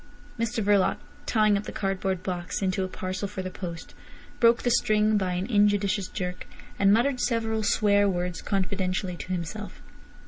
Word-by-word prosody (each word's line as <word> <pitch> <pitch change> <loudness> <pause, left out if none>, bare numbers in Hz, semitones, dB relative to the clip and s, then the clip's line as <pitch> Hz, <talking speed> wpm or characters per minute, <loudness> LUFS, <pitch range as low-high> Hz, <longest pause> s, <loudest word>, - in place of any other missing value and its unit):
Mr 230 -1 -1
Verloc 200 -1 +3 0.3
tying 215 -2 +3
up 200 +1 -2
the - - -5
cardboard 190 -2 -2
box 180 +2 -3
into 190 0 0
a - - -2
parcel 185 +2 -4
for 190 0 -5
the 185 - -5
post, 170 -3 -7 0.5
broke 230 -1 +4
the 245 - +2
string 215 -2 +3
by 190 -3 0
an 180 +1 -1
injudicious 205 -3 +2
jerk, 180 -2 -5 0.3
and 195 0 +5
muttered 250 +5 +3
several 225 -3 0
swear 205 -1 +3
words 180 -2 -2
confidentially 190 -1 -1
to - - -8
himself. 185 +4 -5
200 Hz, 165 wpm, -27 LUFS, 185-215 Hz, 0.5 s, and